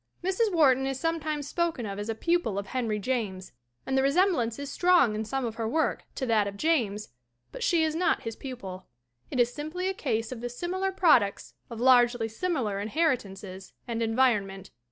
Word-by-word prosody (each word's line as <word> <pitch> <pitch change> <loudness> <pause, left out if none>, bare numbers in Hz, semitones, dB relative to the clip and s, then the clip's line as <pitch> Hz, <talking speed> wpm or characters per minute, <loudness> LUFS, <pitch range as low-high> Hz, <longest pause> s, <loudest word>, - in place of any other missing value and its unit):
Mrs. 385 +4 +1
Wharton 270 -6 +4
is 270 -1 -3
sometimes 310 -3 -2
spoken 335 -9 -1
of 200 -1 -5
as 205 +2 -5
a 225 - -1
pupil 335 - 0
of 200 - -2
Henry 230 -4 -2
James, 205 -5 -3 0.3
and 265 - -1
the 265 - +4
resemblance 275 - +2
is 280 -1 -6
strong 350 -11 +4
in 215 +1 -2
some 265 +4 -2
of 230 - -3
her 225 -1 -1
work 315 +5 0
to 265 - -2
that 220 -4 +2
of 200 0 -6
James, 215 -9 0 0.4
but - - -9
she 340 -2 +3
is 315 -1 0
not 335 +1 +1
his 225 -1 -5
pupil. 195 -9 -8 0.4
It 255 - -3
is 245 0 +3
simply 310 +5 -4
a - - -1
case 225 -10 -2
of 245 -3 -6
the 245 - -3
similar 365 +9 -2
products 300 - +3 0.2
of 230 -2 -7
largely 245 -2 +4
similar 225 - -2
inheritances 200 - -2
and 230 -1 -2
environment. 220 -5 +1
250 Hz, 190 wpm, -28 LUFS, 220-320 Hz, 0.4 s, Wharton